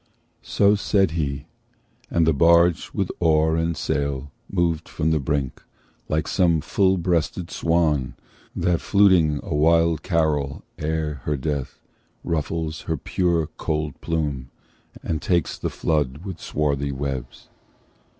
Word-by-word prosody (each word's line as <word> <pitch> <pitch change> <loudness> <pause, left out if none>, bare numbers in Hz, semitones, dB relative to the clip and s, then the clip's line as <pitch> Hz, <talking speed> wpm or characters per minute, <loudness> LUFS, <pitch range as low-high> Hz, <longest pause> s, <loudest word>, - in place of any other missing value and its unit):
So 100 0 +3
said 100 -3 +2
he, 70 -4 -2 0.6
and 85 -1 +2
the 80 - +3
barge 85 +2 +4
with - - -2
oar 80 -1 +3
and 80 0 -1
sail 70 -1 -2 0.2
Moved 85 -4 0
from 80 +1 -1
the 80 - +2
brink, 70 -1 -2 0.5
like 80 0 0
some 85 -4 +2
full 95 +5 +2
breasted 85 0 -1
swan 75 -5 +1 0.4
That, 85 -1 +1
fluting 90 -7 +4
a - - -4
wild 80 +2 +3
carol 75 -5 0 0.2
ere 75 -3 -2
her 75 -1 0
death, 70 -1 -3 0.4
Ruffles 80 0 -2
her 80 - 0
pure 85 +1 0
cold 75 -2 -3
plume, 75 -6 -2 0.5
and 80 -2 -2
takes 85 -5 0
the - - -3
flood 75 0 -1
With 95 -4 -6
swarthy 70 -2 -1
webs. 65 -2 -5
80 Hz, 130 wpm, -23 LUFS, 75-85 Hz, 0.6 s, barge